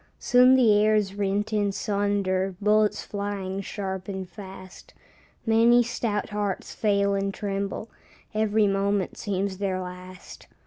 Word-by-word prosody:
Soon 250 +1 +5
the 240 -5 +5
air 215 0 +4
is 200 -2 0
rent 205 +1 -1
in 205 -1 +1
sunder, 195 -2 -1
Bullets 210 0 +2
flying 200 -1 -4
sharp 190 -2 -5
and 190 -2 -5
fast, 190 -1 -12 0.5
Many 230 +2 +5
stout 225 -3 -2
hearts 205 -2 -3
fail 200 -2 +1
and 195 0 -1
tremble, 200 +1 -4 0.5
Every 215 0 +2
moment 195 -1 0
seems 195 -1 -3
their 190 -2 -1
last. 185 0 -10
200 Hz, 130 wpm, -26 LUFS, 195-210 Hz, 0.5 s, Soon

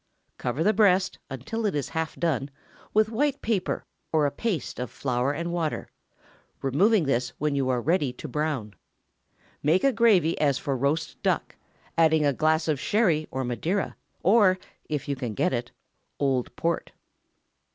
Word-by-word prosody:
Cover 125 +6 -1
the 215 - +4
breast, 190 -3 +3
until 140 - -4
it 195 - -1
is 145 -3 -2
half 160 -1 -3
done, 145 -5 -1 0.4
with 215 0 +3
white 280 +5 0
paper, 210 -5 -1 0.3
or 155 -2 +3
a 140 - +1
paste 180 - -3
of 125 - -3
flour 125 0 -1
and 170 +4 -3
water, 165 -3 -2 0.7
removing 185 - +3
this 125 -3 0
when 150 0 0
you 135 -2 0
are 125 -1 +2
ready 150 0 +1
to 140 - -8
brown. 140 -7 -2 0.9
Make 160 +6 +3
a 275 -1 +4
gravy 205 -8 +3
as 140 -3 +3
for 140 -3 -2
roast 145 +5 -1
duck, - - 0 0.4
adding 160 -2 +4
a 140 - +3
glass 155 +4 +2
of 150 -4 +1
Sherry 170 -5 +2
or 130 0 -3
Madeira, 155 - -1 0.3
or 195 -2 +5 0.3
(if 150 -2 -2
you 140 - -1
can 120 -5 -4
get - - +1
it) 120 0 -2 0.5
old 130 -4 0
Port. 170 +5 -2
155 Hz, 160 wpm, -26 LUFS, 135-185 Hz, 0.9 s, or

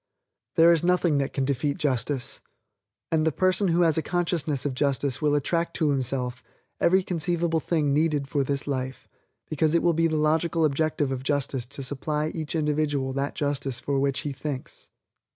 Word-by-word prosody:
There 165 +1 +7
is 165 -1 +3
nothing 175 -4 +2
that 135 - -1
can 135 - -1
defeat 140 +1 -1
justice; 130 -1 -1 0.7
and 160 -1 +2
the 160 - +2
person 185 +5 +2
who 170 0 +2
has 160 -1 +3
a - - 0
consciousness 165 -4 -1
of 140 - -1
justice 140 -1 0
will 150 -1 +2
attract 170 +4 0
to 155 -3 +2
himself 130 -2 -1 0.4
every 190 +2 +4
conceivable 170 -1 0
thing 150 -3 0
needed 150 -2 +1
for 140 0 0
this 140 +1 -2
life, 130 -2 -4 0.4
because 155 +1 +1
it 170 - +2
will 170 - +4
be 165 +1 +2
the 160 -1 -1
logical 160 +2 +2
objective 150 -1 0
of 130 -1 -3
justice 135 -2 -1
to 135 - -6
supply 150 +3 -2
to - - -9
each 155 +1 -4
individual 150 -3 0
that 140 +1 -2
justice 140 -3 -2
for 140 +1 -1
which 140 -1 0
he 145 - -4
thinks. 135 -1 -6
150 Hz, 185 wpm, -26 LUFS, 135-165 Hz, 0.7 s, There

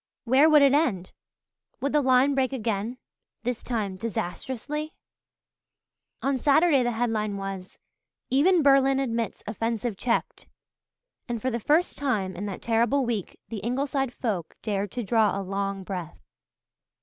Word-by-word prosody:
Where 265 +6 +5
would 300 -2 +7
it 275 -1 +5
end? 225 - +1 0.7
Would 280 +1 -2
the 300 - +4
line 260 +1 +4
break 265 -1 +1
again 225 -1 -2 0.5
this 245 -1 -2
time 210 -6 -3
disastrously? 260 - -4 1.3
On 275 -1 +1
Saturday 290 +1 +4
the 240 -1 0
headline 220 -3 -1
was 195 -1 -6 0.5
"Even 325 +6 +4
Berlin 270 -1 +5
Admits 230 -4 -2
Offensive 225 +1 -2
Checked," 235 +2 -2 0.8
and 235 -1 -2
for 255 +4 -1
the 235 - -2
first 310 +10 +1
time 210 -10 -1
in 205 +4 -4
that 195 - -6
terrible 235 +4 +2
week 225 -6 -3
the 220 -2 -4
Ingleside 270 +3 -1
folk 205 -10 -3
dared 200 -2 -2
to 245 - -3
draw 215 -2 +2
a - - -3
long 195 0 -3
breath. 180 -4 -6
235 Hz, 140 wpm, -26 LUFS, 205-270 Hz, 1.3 s, would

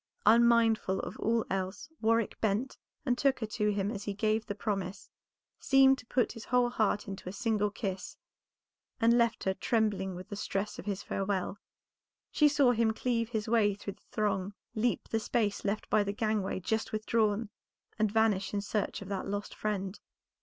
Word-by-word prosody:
Unmindful 225 -3 +4
of - - -6
all 230 0 +1
else 190 +6 -3
Warwick 230 -1 +1
bent 220 +5 0 0.3
and 250 -3 +2
took 270 +1 +2
her 225 - -2
to 210 0 0
him 200 0 -1
as 205 -3 -5
he 205 - -3
gave 215 +1 0
the 205 - -3
promise, 195 -3 -3 0.5
seemed 270 0 +5
to 250 - -13
put 250 -1 +1
his 225 -2 -9
whole 245 -1 +2
heart 210 -3 0
into 195 -2 -6
a - - -5
single 210 0 0
kiss 195 -3 -5 0.8
and 230 +1 +5
left 235 -1 +2
her 190 - +1
trembling 200 -3 0
with 180 +1 -9
the 205 - -5
stress 200 0 -3
of - - -9
his 200 -2 -2
farewell. 195 0 -2 0.7
She 300 - +5
saw 280 -3 +4
him 225 -2 +2
cleave 230 -1 -1
his 220 -3 -2
way 215 -3 +3
through 200 0 -6
the 205 - -32
throng, 200 -2 -1 0.2
leap 230 +2 0
the 225 - +1
space 215 -2 0
left 205 +1 -2
by 215 -1 +4
the 200 0 -2
gangway 210 -3 -1
just 220 +4 -1
withdrawn, 215 0 0 0.5
and 215 -1 +2
vanish 210 -3 +2
in 200 - 0
search 205 0 -2
of 195 - -11
that 195 -1 -3
lost 205 +1 -3
friend. 200 -2 -3
215 Hz, 180 wpm, -31 LUFS, 200-230 Hz, 0.8 s, seemed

